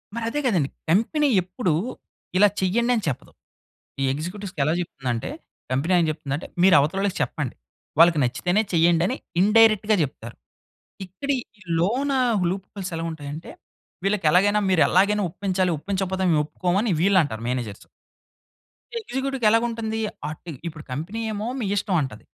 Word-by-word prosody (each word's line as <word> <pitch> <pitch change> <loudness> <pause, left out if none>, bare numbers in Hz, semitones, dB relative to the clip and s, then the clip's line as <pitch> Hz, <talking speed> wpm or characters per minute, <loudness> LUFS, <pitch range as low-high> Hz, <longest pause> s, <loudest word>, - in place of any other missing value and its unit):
మరదే 235 +4 -2
గదండీ! 175 - +2 0.2
కంపెనీ 230 - +2
ఎప్పుడూ 180 -2 -1 0.6
ఇలా 205 - +7
చేయండి, 230 +6 +1
అని 220 - -1
చెప్పదు. 135 - -4 0.7
ఈ - - +2
ఎగ్జిక్యూటివ్స్‌కి 180 +3 -5
ఎలా 155 +3 +2
చెప్తుందంటే 125 -8 -4 0.4
కంపెనీ 140 +8 +1
ఏం 165 - +3
చెప్తుందంటే, 150 -1 -4 0.2
"మీరు 190 -1 +7
అవతలోళ్ళకి 190 +7 0
చెప్పండి. 145 -6 -2 0.4
వాళ్ళకి 170 -2 +6
నచ్చితేనే 175 - +1
చేయండి" 170 0 +4
అని 255 - -1 0.3
ఇన్‌డైరెక్ట్‌గా 215 +1 +5
జెప్తారు. 120 -5 -5 0.7
ఇక్కడి 275 +10 -2 0.2
ఈ 205 - -17 0.2
లోనా, 260 +10 +1 0.3
లూప్ 190 +1 -4
హోల్స్ 190 -3 -5
ఎలా 165 - -3
ఉంటాయంటే, 150 0 -7 0.5
వీళ్ళకి 195 -4 +1
ఎలాగైనా 205 +4 +4
"మీరు 180 -4 +4
ఎలాగైనా 200 +2 +3
ఒప్పించాలి, 185 -1 0
ఒప్పించకపోతే 190 +2 -2
మేము 150 -2 +3
ఒప్పుకోమని" 185 +6 0
వీళ్ళంటారు 170 - +2
మేనేజర్స్. 120 -5 -4 1.1
ఎగ్జిక్యూటివ్‌కి 270 - -3
ఎలాగా 230 +2 +3
ఉంటంది? 225 -1 -3 0.3
అటు 160 +2 -8 0.2
ఇప్పుడు 155 -2 -8
కంపెనీ 165 - -4
ఏమో 210 +2 -3
"మీ 235 - -2
ఇష్టం" 200 -1 0
అంటది. 130 -6 -6
185 Hz, 135 wpm, -24 LUFS, 155-210 Hz, 1.1 s, ఇలా